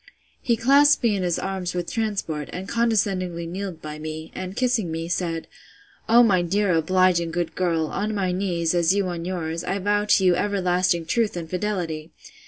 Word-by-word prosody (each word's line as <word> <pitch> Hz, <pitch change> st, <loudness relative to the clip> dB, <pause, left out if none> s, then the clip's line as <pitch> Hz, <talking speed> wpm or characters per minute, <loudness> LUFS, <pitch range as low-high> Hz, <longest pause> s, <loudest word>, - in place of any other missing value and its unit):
He 235 Hz, -2 st, +1 dB
clasped 280 Hz, +5 st, +5 dB
me 225 Hz, -3 st, +3 dB
in 195 Hz, -, -2 dB
his 175 Hz, -2 st, 0 dB
arms 190 Hz, -2 st, -3 dB
with 175 Hz, -1 st, -3 dB
transport, 200 Hz, -10 st, -2 dB
and 185 Hz, +2 st, -6 dB
condescendingly 195 Hz, -7 st, 0 dB
kneeled 180 Hz, -1 st, -6 dB
by 150 Hz, 0 st, -6 dB
me, 155 Hz, +1 st, -6 dB
and 185 Hz, +1 st, -6 dB
kissing 240 Hz, -7 st, 0 dB
me, 165 Hz, +1 st, -3 dB
said, 170 Hz, -2 st, -2 dB, 0.6 s
O 235 Hz, +2 st, +7 dB
my 190 Hz, -6 st, +3 dB
dear 195 Hz, +3 st, +1 dB
obliging 170 Hz, +1 st, +2 dB
good 170 Hz, 0 st, -2 dB
girl, 170 Hz, -3 st, 0 dB
on 210 Hz, +7 st, -3 dB
my 190 Hz, -3 st, 0 dB
knees, 180 Hz, -3 st, 0 dB
as 175 Hz, +1 st, +3 dB
you 200 Hz, -1 st, +1 dB
on 170 Hz, -1 st, -5 dB
yours, 170 Hz, -2 st, -3 dB
I 195 Hz, -, -2 dB
vow 205 Hz, +1 st, +1 dB
to 200 Hz, -2 st, +3 dB
you 180 Hz, -, +5 dB
everlasting 180 Hz, -4 st, +1 dB
truth 215 Hz, +2 st, 0 dB
and 165 Hz, -2 st, -5 dB
fidelity! 175 Hz, -4 st, -3 dB
185 Hz, 185 wpm, -24 LUFS, 170-205 Hz, 0.6 s, O